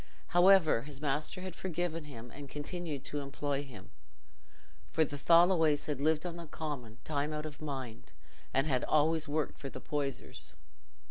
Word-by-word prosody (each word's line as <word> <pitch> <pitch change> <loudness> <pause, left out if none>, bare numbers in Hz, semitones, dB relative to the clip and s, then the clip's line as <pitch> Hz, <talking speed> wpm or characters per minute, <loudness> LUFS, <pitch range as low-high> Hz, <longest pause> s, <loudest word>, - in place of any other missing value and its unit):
However, 175 -7 +6
his 140 0 -6
master 150 +4 -1
had 185 -1 -6
forgiven 170 -3 -2
him, 120 -4 -9
and 140 -1 -9
continued 150 0 -4
to 145 - -3
employ 140 0 -2
him, 115 -10 -11 1.0
for 160 - +3
the 145 - -6
Tholoways 165 0 +5
had 145 -3 -2
lived 155 +2 +2
on 175 -1 -3
the 170 -1 -8
Common 140 -8 -5
time 150 0 -1
out 150 0 -3
of 150 -1 -7
mind, 130 -6 -5 0.4
and 135 +1 +2
had 130 -5 +1
always 155 +1 +3
worked 150 +1 -1
for 135 - -5
the - - -7
Poysers. 140 -3 -3
150 Hz, 160 wpm, -33 LUFS, 140-160 Hz, 1.0 s, However